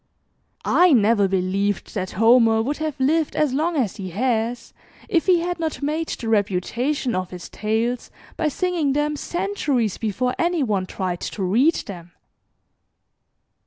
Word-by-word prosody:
I 355 -3 +5
never 215 -3 +4
believed 195 +2 -1
that 185 -3 -3
Homer 225 0 +5
would 285 +5 -2
have 310 -3 -4
lived 305 +4 +1
as 300 -4 +1
long 320 +5 0
as 235 -9 -1
he 190 -3 -5
has, 230 +4 -1 0.3
if 345 -5 +1
he 355 -2 +4
had 350 0 -3
not 320 -3 -3
made 310 +3 -1
the 230 - -5
reputation 225 +6 0
of 185 -1 -2
his 180 -1 -9
tales 225 +3 -2 0.3
by - - 0
singing 330 -2 0
them 295 +1 0
centuries 295 - -1
before 245 +4 -1
any 340 -3 +1
one 200 -6 -1
tried 180 -2 -3
to 200 - -4
read 245 - +3
them. 175 -3 -9
245 Hz, 150 wpm, -22 LUFS, 205-305 Hz, 0.3 s, I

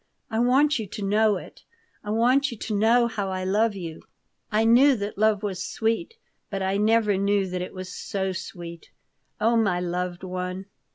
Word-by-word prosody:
I 220 - 0
want 270 +4 +3
you 215 - -4
to 205 +1 -6
know 210 +1 +3
it. - - -12 0.4
I 210 - -7
want 250 +6 +3
you 235 - -7
to 215 0 -3
know 230 +4 +4
how 215 -4 -3
I 185 0 -3
love 210 +3 +1
you. 165 -4 -7 0.5
I 220 +1 +2
knew 260 +5 +6
that 205 -1 -4
love 215 0 +2
was 190 -3 -3
sweet, 230 - -2 0.3
but 195 -2 -3
I 190 +1 0
never 210 -1 +3
knew 200 0 +2
that 180 0 -4
it 180 - -6
was 185 0 -7
so 190 -1 -3
sweet. 170 -2 -8 0.5
Oh, 230 +2 +3
my 200 -6 +2
loved 180 0 -3
one!" 185 +1 -4
205 Hz, 185 wpm, -25 LUFS, 185-225 Hz, 0.5 s, knew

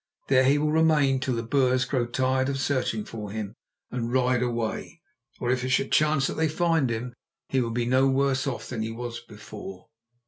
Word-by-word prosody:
There 130 -1 +5
he 140 +2 +4
will 150 +1 +1
remain 155 -4 +3
till 130 -1 -1
the 115 - -2
Boers 130 0 +2
grow 125 -2 -1
tired 130 +2 +1
of 135 -1 -2
searching 125 -6 -1
for 110 -2 -7
him 105 0 -5 0.4
and 120 -1 -3
ride 125 -1 +2
away. 120 +6 -3 0.4
Or 120 - 0
if 125 -1 0
it 130 - -2
should 130 +1 +1
chance 150 -2 +3
that - - -3
they 160 0 +2
find 165 -4 +1
him, 120 +2 -3 0.4
he 130 - +2
will 115 - -1
be 120 +1 -1
no 130 +2 +3
worse 135 0 +1
off 115 -4 -4
than 120 -3 -4
he 110 - -2
was 120 +1 -5
before." 105 -3 -11
130 Hz, 205 wpm, -26 LUFS, 115-135 Hz, 0.4 s, There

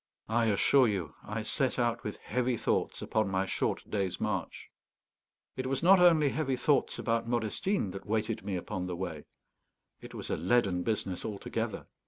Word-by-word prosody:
I 115 +1 +2
assure 120 +5 +4
you 95 -8 -2
I 110 +1 -4
set 130 +4 0
out 120 -1 0
with 105 - -4
heavy 125 -1 -1
thoughts - - -1
upon 110 -2 0
my 95 0 0
short - - -2
day's 95 -3 -2
march. 100 -3 -3 0.8
It 130 0 -3
was 135 +4 -1
not 190 +2 +7
only 165 -5 +6
heavy 135 -2 -1
thoughts 140 +3 +1
about 115 -1 0
Modestine 120 - 0
that 95 +1 -8
weighted 110 +1 -1
me 100 - -2
upon 90 +1 -4
the 90 - -3
way; 85 -4 -5 0.8
it - - -10
was - - -5
a - - 0
leaden 95 0 +2
business 95 -2 -2
altogether. 105 -2 -4
110 Hz, 170 wpm, -31 LUFS, 95-125 Hz, 0.8 s, not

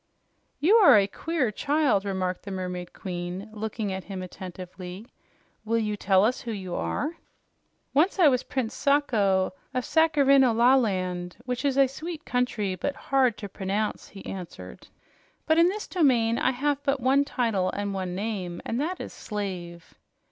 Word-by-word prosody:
"You 385 +9 +5
are 390 - +8
a 200 - +4
queer 275 +3 -1
child," 280 -5 +1
remarked 185 -2 -2
the 200 - -9
Mermaid 180 -2 -5
Queen, 180 +2 -5
looking 215 -1 -3
at 190 0 -5
him 190 -2 -6
attentively. 185 +1 -8 0.6
"Will 230 +1 0
you 210 -2 -1
tell 195 -1 +3
us 245 +3 0
who 235 - -5
you 190 -4 -5
are?" 315 - -2 0.8
"Once 320 +9 +3
I 355 -5 +6
was 255 -3 +3
Prince 255 -5 -3
Sacho 210 -11 +2 0.2
of 255 - 0
Sacharhineolaland, 245 - +3
which 250 +1 -3
is 275 -2 +1
a 275 - +7
sweet 310 +5 -7
country, 240 -6 -1
but 275 +10 -3
hard 265 -6 +1
to 205 - -6
pronounce," 200 +2 -3
he 195 - -12
answered. 165 - -8 0.6
"But 315 +1 +3
in 340 +1 +6
this 420 +2 -4
domain 240 -9 +2
I - - +2
have 285 +2 0
but 275 -1 0
one 265 +3 +3
title 225 -9 0
and 205 0 -3
one 185 -2 -3
name, 190 -4 -3
and 235 +4 -1
that 355 +5 -2
is - - -7
'Slave.'" 180 -5 -6
220 Hz, 160 wpm, -26 LUFS, 190-275 Hz, 0.8 s, are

